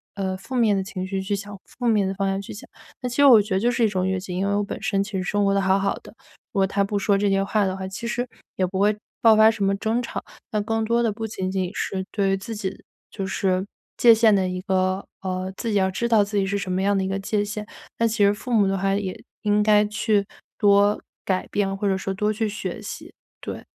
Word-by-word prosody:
呃， 190 -1 -2
负 255 +7 -8
面 225 -4 +3
的 195 - 0
情 185 -1 -5
绪 190 0 -2
去 200 +1 -1
想、 205 +1 -7
负 245 -1 -5
面 210 -4 +3
的 190 - -2
方 195 0 -1
向 195 0 -1
去 200 - -9
想。 205 - -10 0.3
那 250 - -2
其 245 - -6
实 285 - +6
我 245 -5 +9
觉 205 -1 -4
得 190 - +2
就 240 +3 +2
是 240 -2 +2
一 - - +4
种 185 -2 -1
越 190 -1 0
界， 185 -1 -7
因 190 +2 -1
为 200 - +1
我 205 - +1
本 200 - -6
身 195 0 +1
其 210 - -9
实 185 - -1
生 205 +2 0
活 195 - +3
得 200 - +2
好 190 0 +3
好 195 0 +1
的， - - -12 0.4
如 195 - -1
果 195 - +4
她 200 +1 +1
不 205 +1 -1
说 200 +1 +2
这 200 0 +1
些 195 0 +2
话 205 +1 +1
的 190 0 -2
话， 190 0 -5
其 210 +5 -6
实 245 +1 -2 0.3
也 185 - +1
不 190 +1 -3
会 210 +1 +3 0.2
爆 225 -2 +7
发 220 +1 +7
什 220 -2 -3
么 195 0 +2
争 220 +4 0
吵。 235 - -5 0.3
但 210 -1 0
更 225 +1 -1
多 235 +1 +2
的 225 - +2
不 225 +2 -5
仅 190 -3 -3
仅 185 -2 -1
是 190 -1 -2
对 200 -2 +1
于 195 - +1
自 225 +4 -6
己 195 -2 -5 0.3
就 195 - -4
是 190 -1 0 0.3
界 235 - +7
限 220 -2 +5
的 190 -1 +1
一 180 0 -3
个 185 0 0 0.2
呃， 185 0 -3
自 230 - -3
己 - - 0
要 190 -1 +2
知 235 +5 -1
道 215 -3 +5
自 205 +1 -6
己 195 - +2
是 200 +1 0
什 185 -2 -4
么 185 - 0
样 200 0 +2
的 190 - 0
一 190 - -1
个 195 +1 -2
界 205 +1 -1
限， 210 0 -5 0.3
那 230 - +3
其 215 -2 +2
实 200 - +4
父 250 +5 -7
母 210 -3 +4
的 195 - 0
话 195 +1 +1
也 195 -2 -4 0.2
应 210 0 +3
该 210 0 +5
去 210 -1 +1 0.3
多 205 0 +4 0.3
改 185 -1 -1
变， 195 -1 0
或 200 +1 -1
者 190 - +2
说 195 - -3
多 210 +2 0
去 220 0 -1
学 210 - -5
习， - - -8 0.3
对。 - - -6
200 Hz, 300 characters per minute, -23 LUFS, 190-215 Hz, 0.4 s, 我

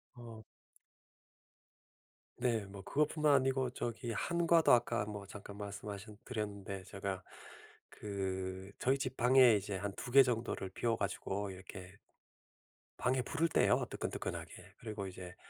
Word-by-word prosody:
어 115 -2 -9 2.0
네. 115 -4 +1
뭐 95 0 -10
그거 150 +9 +2
뿐만 150 -1 +2
아니고 130 -1 +2
저기 120 -1 -3
한과도 170 +5 +3
아까 120 -3 +4
뭐 105 -1 -6
잠깐 100 0 -9
말씀하신 100 +1 -6
드렸는데 100 -4 -4
제가 95 0 -4 0.7
그 95 -1 -4
저희 135 +2 +2
집 135 - -3
방에 125 -1 +7
이제 100 0 -2
한 100 +1 -3
2 125 - -6
개 135 - +9
정도를 115 -5 -1
비워 115 +4 0
가지고 100 0 -2
이렇게 95 0 -10 1.0
방에 130 +1 +2
불을 165 +6 +1
때요 - - +3
뜨끈뜨끈하게. - - -4 0.3
그리고 105 -4 -5
이제 90 -1 -8
105 Hz, 265 characters per minute, -35 LUFS, 100-125 Hz, 2.0 s, 개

